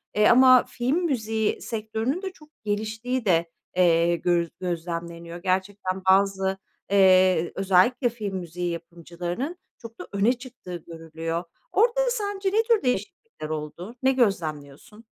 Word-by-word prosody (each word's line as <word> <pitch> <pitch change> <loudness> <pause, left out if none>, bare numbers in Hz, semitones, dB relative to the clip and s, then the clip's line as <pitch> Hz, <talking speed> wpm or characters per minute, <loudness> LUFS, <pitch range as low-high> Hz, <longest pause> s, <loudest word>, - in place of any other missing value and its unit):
eee, 210 0 +5
ama 255 0 +7
film 255 +6 -1
müziği 220 -7 -1
sektörünün 225 - -3
de 380 -1 -4
çok 300 -4 -19
geliştiği 220 +4 -2
de, 170 -3 +2 0.3
eee, 170 -1 +4
göz 170 -1 +1
gözlemleniyor. 170 -1 -5
Gerçekten 190 +1 -2
bazı, 195 0 +3 0.3
eee, 185 -3 +5
özellikle 195 +7 +3
film 210 -5 -5
müziği 175 0 -4
yapımcılarının 175 - -5 0.2
çok 230 -1 -12
da - - -8
öne 205 +5 +3
çıktığı 245 -8 -10
görülüyor. 165 +1 -5 0.3
Orada 475 +3 +3
sence 405 -4 -2
ne 440 +3 +2
tür 460 -2 +2
değişiklikler 250 - -3
oldu? 155 +8 -6
Ne 265 - +5
gözlemliyorsun? 190 - -2
195 Hz, 125 wpm, -25 LUFS, 170-245 Hz, 0.3 s, ama